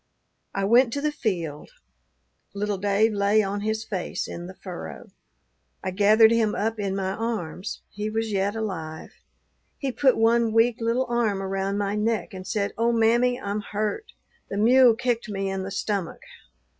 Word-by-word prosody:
I 195 - 0
went 235 +3 +5
to 285 - -2
the 300 0 0
field. 175 - -3 0.9
Little 205 -1 -2
Dave 205 +3 +2
lay 205 +1 +3
on 200 +1 -3
his 220 +1 -1
face 185 -4 -3
in 175 +1 -7
the 185 - -10
furrow. 180 -2 -8 0.7
I 185 - -2
gathered 215 +3 +5
him 225 -2 +2
up 220 +1 -1
in 195 -2 -1
my 190 -1 -1
arms; 205 -4 -4
he 210 +1 -4
was 225 0 -2
yet 200 +1 0
alive; 165 -8 -5 0.7
he 275 -2 -2
put 265 0 +3
one 230 0 +3
weak 230 +1 +4
little 235 +3 +1
arm 235 -5 0
around 195 +1 -2
my 205 -1 -1
neck, 215 +1 -1
and 185 0 -8
said, 200 -1 -1
'Oh, 235 +1 +3
mammy, 235 +2 +3
I'm 205 -3 -3
hurt. 215 - -3 0.4
The 200 - -4
mule 240 +2 +6
kicked 240 -2 -1
me 195 -1 -2
in 195 0 -3
the 190 - -5
stomach.' 200 -2 -3
210 Hz, 170 wpm, -25 LUFS, 195-230 Hz, 0.9 s, mule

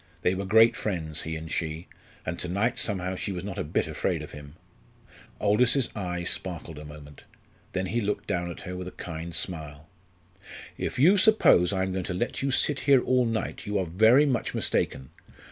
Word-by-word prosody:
They 90 - +3
were 95 +1 -3
great 110 +3 +6
friends, 80 -6 -2
he 80 0 -4
and 80 0 -7
she, 80 +1 -3 0.4
and 85 +1 -4
to - - 0
night 100 +7 0
somehow 95 -3 -1
she 100 - -4
was 90 -2 -5
not 100 -2 -5
a - - -1
bit 75 - -1
afraid - - -2
of - - -10
him. 75 0 -11 0.8
Aldous's 120 +5 +3
eye 90 -4 -3
sparkled 85 -3 -2
a 75 - -9
moment; 75 -1 -12 0.5
then 95 0 -1
he 115 +6 -1
looked 105 0 -2
down 85 -1 -2
at 85 - -8
her 90 -1 -6
with 90 0 -6
a - - -6
kind 85 0 -6
smile. 75 -4 -3 0.9
"If - - -4
you 175 +10 +6
suppose 185 - +5
I 95 -1 0
am 95 - -2
going 95 0 -2
to 90 - -3
let 120 +7 -2
you 140 - 0
sit 140 +1 +2
here 135 -3 +6
all 125 -1 +2
night, 110 -3 -3
you 105 0 0
are 95 - 0
very 110 - +5
much 130 -5 -1
mistaken. 65 - -1
95 Hz, 200 wpm, -27 LUFS, 80-110 Hz, 0.9 s, great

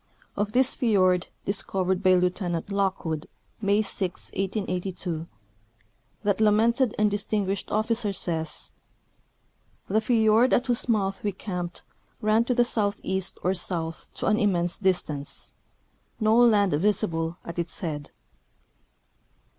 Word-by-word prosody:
Of 205 +1 -2
this 260 +1 +4
fiord, 185 -6 +2 0.2
discovered 190 -2 0
by 185 -2 +5
Lieutenant 180 0 -1
Lock 195 -2 0
wood 160 0 -3 0.3
May 205 +1 +2
6, 190 -3 -3
1882, 185 -4 -3 1.0
that 205 +1 +1
lamented 225 +3 +3
and 210 -1 +2
distinguished 200 -1 -1
officer 220 0 0
says: 165 -5 -3 0.6
" - - -41
The 215 +3 +2
fiord 225 +1 +3
at 245 - +3
whose 245 -1 0
mouth 195 -3 +1
Ave 205 -1 -2
camped 180 -3 -5 0.4
ran 215 +2 +2
to 250 - 0
the 240 0 +4
southeast 200 -4 0
or 185 - +2
south 165 -3 -3
to - - -3
an 215 +1 +2
immense 175 -5 +2
distance; 160 -7 -1 0.7
no 215 0 +3
land 215 -6 +5
visible 165 -1 0
at 170 0 -6
its 170 -1 -4
head." 150 -5 -4
195 Hz, 125 wpm, -26 LUFS, 180-215 Hz, 1.0 s, by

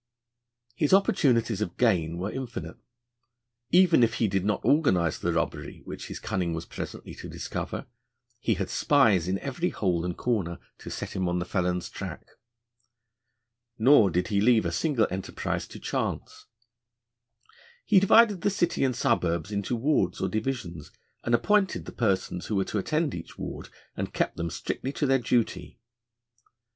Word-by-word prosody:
His 150 +7 +3
opportunities 125 - +2
of 105 - -3
gain 85 -9 +2
were 95 +4 -3
infinite. 130 -3 -6 0.9
Even 175 -4 +5
if 115 0 +3
he 115 - +1
did 95 -1 0
not 105 -1 0
organise 95 - +3
the 85 - 0
robbery 80 -3 -3
which - - -7
his - - -6
cunning 85 -3 -2
was 80 +1 -5
presently - - -7
to - - -9
discover, - - -5 0.5
he 115 -2 +1
had 95 0 -3
spies 110 - +3
in 95 +1 0
every 145 - -2
hole 90 -4 0
and 90 0 -3
corner 100 -9 -1 0.2
to - - -9
set - - -6
him 95 -2 0
on 90 - 0
the 90 - -2
felon's 90 -2 -1
track. - - -7 1.5
Nor 115 -3 +6
did 90 +1 -1
he 100 -2 +2
leave 115 -2 +4
a 85 - 0
single 125 - +1
enterprise 95 +1 -3
to - - -10
chance: - - -4 1.4
'He 195 - +6
divided 205 0 +5
the - - +2
city 175 -6 0
and 130 -2 +1
suburbs 85 0 0
into 100 +3 -1
wards 140 +6 +1
or 95 - 0
divisions, 105 - -3 0.3
and 120 - +3
appointed 205 - +1
the - - -7
persons 95 -5 -1
who 110 - -1
were 95 -1 +1
to 105 - -2
attend 155 - 0
each - - -8
ward, - - -6 0.3
and - - -4
kept - - 0
them 85 0 -3
strictly 130 - -4
to 145 - -1
their 135 -1 +3
duty.' 120 -1 -1
110 Hz, 160 wpm, -27 LUFS, 90-135 Hz, 1.5 s, Nor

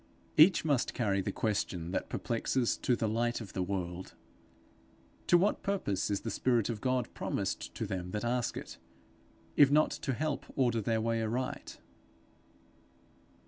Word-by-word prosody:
Each 165 +2 +6
must 140 -6 +1
carry 100 -5 +1
the 100 - -2
question 95 -6 -2
that - - -2
perplexes 120 +1 0
to 125 - +1
the 115 - -1
Light 120 +2 0
of 110 -5 -9
the 95 - -2
World. 90 -1 -4 1.1
To 175 - +7
what 195 +4 +1
purpose 185 - -1
is 100 -1 0
the 115 - -4
spirit 120 0 +1
of 110 -3 -3
God 130 -2 0
promised - - -3
to - - -2
them 90 -1 -4
that 105 +4 -3
ask 120 0 0
it, - - -8 0.8
if 145 -2 +7
not 150 +2 +4
to 145 -2 -2
help 150 +2 -2
them - - -14
order 120 -4 +2
their 110 +1 0
way 115 0 0
aright? 120 +4 -3
115 Hz, 160 wpm, -32 LUFS, 100-130 Hz, 1.1 s, To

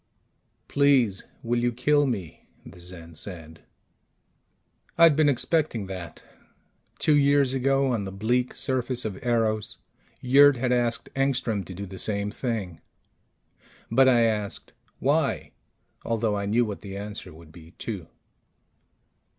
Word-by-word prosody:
"Please, 135 -8 +2 0.2
will 120 0 0
you 120 0 +1
kill 145 +4 +2
me?" 95 - -5 0.2
the - - -13
Zen 85 -2 -10
said. 80 -1 -7 1.4
I'd 165 -3 +7
been 155 -1 +4
expecting 140 -4 0
that. 90 -4 -8 0.7
Two 155 - +3
years 140 -2 +3
ago, 135 0 +1
on 105 -4 -2
the 95 - -6
bleak 120 +6 -1
surface 130 -2 -1
of 100 -4 -5
Eros, 110 -3 0 0.4
Yurt 140 +2 +6
had 125 +1 -1
asked 120 -1 0
Engstrom 130 -6 0
to 95 - -9
do 100 +2 -6
the 95 0 -8
same 100 -1 -1
thing. 110 -9 -4 1.1
But 130 +3 +5
I 120 -2 +4
asked, 105 -3 -1 0.2
"Why?" - - 0 0.5
although 115 -2 0
I 100 0 -2
knew 115 +4 +2
what 105 -2 -6
the 100 -1 -7
answer 100 -2 -7
would 80 0 -15
be, 80 +1 -15
too. 100 -8 -5
115 Hz, 135 wpm, -26 LUFS, 95-130 Hz, 1.4 s, I'd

